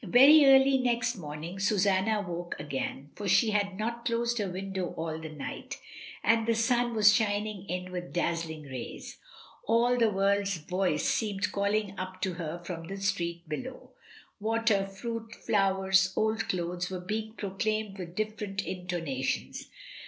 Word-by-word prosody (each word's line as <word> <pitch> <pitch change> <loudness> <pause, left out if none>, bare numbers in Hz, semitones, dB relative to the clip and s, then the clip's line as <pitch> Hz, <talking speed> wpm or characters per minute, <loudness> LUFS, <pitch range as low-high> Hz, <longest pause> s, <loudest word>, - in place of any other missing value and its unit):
Very 275 - +8
early 270 0 +6
next 245 -1 +1
morning 160 +1 -7
Susanna 200 +1 +2
woke 175 0 -4
again, 140 -1 -4
for 205 - -5
she 205 +4 +4
had 200 -2 0
not 235 +2 -3
closed 235 0 0
her 200 -2 -1
window 190 0 -4
all 160 -1 -3
the 160 0 -7
night, 150 -2 -6 0.5
and 225 +1 +3
the 230 - +3
sun 240 +1 +1
was 210 -1 +7
shining 205 -2 -1
in 180 0 -3
with 180 -1 -5
dazzling 165 -2 -2
rays. 130 -4 -7 0.5
All 235 +2 +3
the 230 -2 +4
world's 200 -1 +1
voice 180 -1 -1
seemed 200 -4 0
calling 200 0 0
up 185 0 -5
to 190 -2 0
her 165 -1 -4
from 165 -2 -6
the 195 - -5
street 170 -4 -2
below; 250 +12 -6 0.5
water, 220 -2 +1
fruit, 225 +3 -6
flowers, 190 -2 +2
old 220 +1 0
clothes, 180 0 -2
were 185 -1 -4
being 215 +4 -4
proclaimed 210 0 -2
with 175 -1 -7
different 210 -2 -3
intonations. 170 - -3
195 Hz, 150 wpm, -29 LUFS, 180-220 Hz, 0.5 s, Very